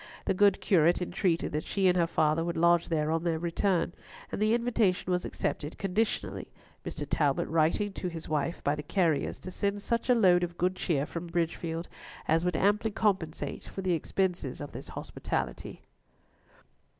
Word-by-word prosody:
The - - +2
good 200 0 +4
curate 170 -2 +4
entreated 180 -1 0
that 150 - -2
she 195 -2 +1
and 180 - +4
her 170 -2 +3
father 155 -1 +2
would 170 0 -2
lodge 170 0 +4
there 155 -2 +1
on 165 0 0
their 170 -2 +1
return, 175 +1 0 0.4
and - - -3
the 215 +2 +4
invitation 225 -7 +1
was 180 0 0
accepted 150 +2 -3
conditionally, 200 +3 -1 0.4
Mr. 150 - -5
Talbot 145 -2 +1
writing 165 +6 +1
to 185 - -4
his 165 -2 -6
wife, 155 +3 -1
by 145 - +2
the 150 - -3
carriers, 160 -4 0
to 185 - -8
send 200 +2 -2
such 235 +3 -1
a 250 - +6
load 185 -6 +5
of 175 -1 -3
good 185 +1 +1
cheer 150 -6 0
from 170 +2 -6
Bridgefield 165 0 -2 0.4
as 165 +2 +3
would 180 -2 0
amply 210 +4 +2
compensate 195 -7 -1
for 195 - -6
the 185 -1 +2
expenses 175 -4 -1
of 145 - -6
this - - -8
hospitality. 65 -2 -4
175 Hz, 175 wpm, -29 LUFS, 160-195 Hz, 0.4 s, a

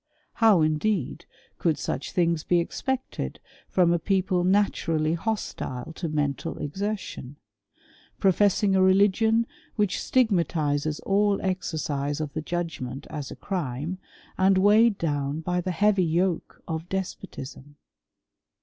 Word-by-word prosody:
How, 215 -8 +5
indeed, 155 - 0 0.3
could 160 -4 +1
such 140 - -3
things 170 -3 +1
be 175 - +3
expected 260 +9 -3 0.3
from 175 -2 +3
a 175 - +1
people 185 0 +1
naturally 170 -5 +1
hostile 165 - -3
to 165 0 -4
mental 145 -2 -2
exertion; 190 -4 -4 0.8
professing 195 +1 +3
a 190 - +4
religion 205 +4 +4 0.3
which 205 -3 0
stigma 220 -9 +3
tizes 150 -2 -1
all 200 0 +2
esercise 150 -6 -2
of 150 -2 -4
the 155 - -3
judgment 155 -6 -4
as 145 -3 -5
a - - -8
crime, 170 -1 -3 0.4
and 190 0 +4
weighed 210 +2 +5
down 145 -1 -1
by 180 +2 -1
the 185 - -3
heavy 195 +2 +3
yoke 170 +1 -1
of 160 +1 -4
despotism? 145 -7 -6
175 Hz, 120 wpm, -26 LUFS, 155-195 Hz, 0.8 s, How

